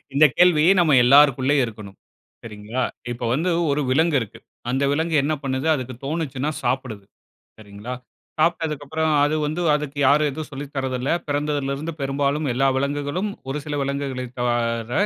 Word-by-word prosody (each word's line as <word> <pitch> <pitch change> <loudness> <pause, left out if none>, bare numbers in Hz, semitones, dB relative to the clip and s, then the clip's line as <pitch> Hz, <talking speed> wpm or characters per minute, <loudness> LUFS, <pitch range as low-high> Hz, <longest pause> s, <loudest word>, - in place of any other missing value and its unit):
இந்த 150 +2 +6
கேள்வி 175 -4 +5
நம்ம 160 -5 +4
எல்லாருக்குள்ளேயும் 140 0 +5
இருக்கணும். 105 -3 -10 0.5
சரிங்களா? 110 +3 -5 0.3
இப்ப 120 0 -5
வந்து 165 +7 0 0.2
ஒரு 145 - +1
விலங்கு 160 +3 +2
இருக்கு. 110 - -7 0.3
அந்த 135 +2 0
விலங்கு 160 +2 -1
என்ன 150 +3 0
பண்ணுது? 130 +2 -2
அதுக்கு 130 -2 -5
தோணுச்சுனா 145 -2 -2
சாப்பிடுது, 125 -5 -2 0.5
சரிங்களா? 105 +3 -8 0.4
சாப்பிட்டதுக்கப்பறம் 160 -1 0
அது 150 - 0
வந்து 155 +4 -3
அதுக்கு 150 -1 -4
யாரும் 150 +2 +4
எதுவும் 155 +2 -7
சொல்லி 140 +2 -6
தரதில்ல. 130 0 -2 0.2
பிறந்ததிலிருந்து 145 +1 -2
பெரும்பாலும் 140 +2 -1
எல்லா 135 +2 +2
விலங்குகளும், 145 +7 -2 0.2
ஒரு 140 +2 -2
சில 150 -1 -4
விலங்குகளை 140 -2 -3 0.2
தவிர 120 -1 -1
140 Hz, 140 wpm, -22 LUFS, 130-150 Hz, 0.5 s, இந்த